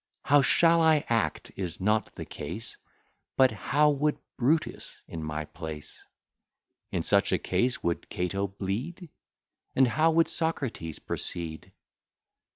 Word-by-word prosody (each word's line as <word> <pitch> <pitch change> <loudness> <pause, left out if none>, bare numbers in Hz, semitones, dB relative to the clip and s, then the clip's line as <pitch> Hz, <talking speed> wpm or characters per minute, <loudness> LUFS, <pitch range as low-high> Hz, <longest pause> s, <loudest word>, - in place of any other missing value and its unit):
How 145 +1 +5
shall 165 +5 +4
I 160 -2 +4
act, 115 -1 0
is 90 -3 -3
not 105 +3 +1
the - - -6
case; 110 +7 -6 0.6
But 130 -2 +6
how 145 +9 +2
would 150 +1 +1 0.2
Brutus 150 +6 0
in 80 -1 -6
my 75 0 -3
place? 75 -1 -8 0.9
In - - -1
such - - +3
a - - +3
case 125 +1 0
would 85 0 -2
Cato 100 +3 -1
bleed? 120 - -5 0.6
And 130 -1 +5
how 155 +8 +3
would 165 0 +4
Socrates 135 - -2
proceed? 80 -2 -3
115 Hz, 130 wpm, -28 LUFS, 90-150 Hz, 0.9 s, But